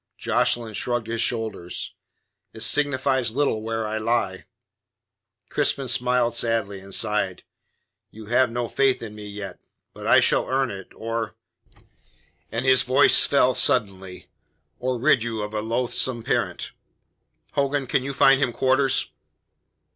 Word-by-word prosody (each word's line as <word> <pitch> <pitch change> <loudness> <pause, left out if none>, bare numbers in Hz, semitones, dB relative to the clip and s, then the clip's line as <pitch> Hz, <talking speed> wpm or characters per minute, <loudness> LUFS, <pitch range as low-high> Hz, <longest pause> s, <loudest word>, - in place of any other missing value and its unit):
Jocelyn 115 -2 0
shrugged 120 +2 -2
his 115 0 -2
shoulders. 110 -8 -3 0.6
"It 110 - -9
signifies 130 -1 +1
little 140 -6 0
where 115 0 -3
I 110 +1 -3
lie." 110 -4 -1 1.0
Crispin 135 -1 0
smiled 125 0 +1
sadly, 115 -4 0
and 100 +1 -12
sighed. 105 -3 0 0.7
"You 110 0 -12
have 120 +3 +2
no 120 +1 -3
faith 135 -1 +1
in 110 -2 -7
me 105 -1 -9
yet. 100 -3 -7 0.3
But - - -8
I - - +6
shall - - +2
earn 130 -1 0
it, 95 -2 -9
or" 115 -1 -4 1.2
and 115 +3 -2
his 130 -1 +6
voice 130 +3 +5
fell 130 -2 +3
suddenly 95 -10 0 0.5
"or 125 0 -1
rid 130 0 +3
you 115 -2 -3
of 105 +1 -6
a 105 - -2
loathsome 120 +1 -1
parent. - - -2 0.8
Hogan, 140 0 0
can 130 - +1
you 135 +1 -5
find 135 0 +5
him 125 - +1
quarters?" 130 +2 +1
115 Hz, 140 wpm, -23 LUFS, 110-130 Hz, 1.2 s, I